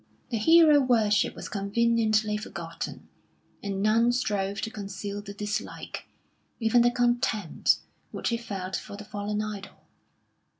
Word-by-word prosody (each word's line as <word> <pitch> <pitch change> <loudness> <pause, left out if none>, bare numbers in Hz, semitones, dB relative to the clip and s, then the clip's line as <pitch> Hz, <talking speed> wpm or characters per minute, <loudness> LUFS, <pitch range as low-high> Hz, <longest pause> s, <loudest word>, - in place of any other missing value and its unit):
The 230 - 0
hero 320 +3 +7
worship 220 -6 +2
was - - -7
conveniently 215 +1 +1
forgotten, 210 +2 -6 0.5
and 195 -1 -2
none 225 +3 +4
strove 200 -5 -1
to 225 - -3
conceal 200 0 -5
the 205 0 -8
dislike, 210 +3 -5 0.5
even 230 +1 +4
the 240 - +5
contempt, 240 -6 +1 0.3
which - - -2
he 235 - 0
felt 190 -5 -5
for 200 - -6
the 205 - -9
fallen 210 +1 -3
idol. 205 -2 -7
215 Hz, 130 wpm, -27 LUFS, 200-235 Hz, 0.5 s, hero